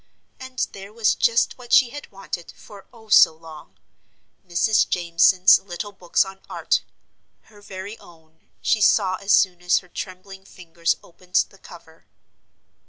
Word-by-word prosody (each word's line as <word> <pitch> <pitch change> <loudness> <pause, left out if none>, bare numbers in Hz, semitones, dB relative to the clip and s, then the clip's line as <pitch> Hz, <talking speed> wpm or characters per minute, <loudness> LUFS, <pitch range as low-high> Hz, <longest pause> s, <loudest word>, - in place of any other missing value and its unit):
And 260 -1 -3
there 195 +1 -11
was 220 -1 +1
just 230 +2 +1
what 240 -1 -13
she 245 -3 +5
had 290 0 -10
wanted 190 -3 -8
for, 205 -2 -15
oh, 225 -3 -18
so 165 -5 +6
long 155 - -14 0.7
Mrs. 190 +4 +1
Jameson's 180 +2 +4
little 195 +2 -7
books 185 -1 0
on 190 0 -12
Art - - 0 0.7
her 205 - -17
very 195 +2 -9
own, 160 -1 -21
she 220 - +1
saw 185 -2 +3
as 200 +1 -3
soon 180 -3 +3
as 180 +1 +2
her 180 - -5
trembling 190 +1 -9
fingers 170 -3 -3
opened 180 +2 -17
the 195 - -21
cover. 165 -3 -16
190 Hz, 150 wpm, -22 LUFS, 175-205 Hz, 0.7 s, so